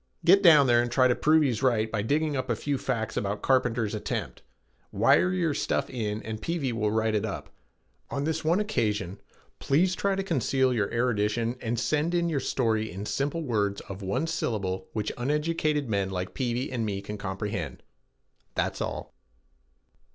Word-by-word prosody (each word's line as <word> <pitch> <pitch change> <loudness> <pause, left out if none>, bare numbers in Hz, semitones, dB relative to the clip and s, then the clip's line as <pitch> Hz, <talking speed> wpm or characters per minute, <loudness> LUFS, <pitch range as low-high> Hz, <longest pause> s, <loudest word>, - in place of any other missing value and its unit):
Get 195 - +7
down 155 -7 +8
there 120 -2 +5
and 120 0 -2
try 130 0 +4
to 125 - +3
prove 155 +4 +4
he 140 - +2
is 115 -2 -2
right 115 -4 +2
by 110 - 0
digging 150 +6 0
up 130 -1 -3
a 120 - +2
few 140 +4 -2
facts 110 -2 -2
about 100 +1 -2
Carpenter's 120 -5 +1
attempt. 105 - -4 0.5
Wire 180 - +4
your 175 -4 +1
stuff - - -1
in 110 -4 -3
and 110 0 -5
Peavey 155 -7 -1
will 105 -2 0
write 110 0 +1
it 105 -1 +1
up. 105 -3 -5 0.6
On 140 - -2
this 160 +1 -1
one 165 +5 +3
occasion, 105 - -1 0.4
please 175 +7 +2
try 195 +1 0
to 195 - -1
conceal 130 - +1
your 105 -4 0
erudition 115 0 0
and 115 0 -1
send 150 +9 0
in 170 -1 +1
your 150 -4 0
story 110 -4 0
in 95 +4 -6
simple 145 +8 -1
words 105 -6 0
of 95 +1 -9
one 100 +10 -1
syllable 95 - -2
which 105 -1 -2
uneducated 150 +1 0
men 100 -3 0
like 95 -1 -4
Peavey 125 0 -2
and 120 -3 -1
me 100 -3 -2
can 105 +1 -6
comprehend. 95 -6 -4 0.7
That's - - -1
all." - - -4
120 Hz, 180 wpm, -27 LUFS, 105-150 Hz, 0.7 s, down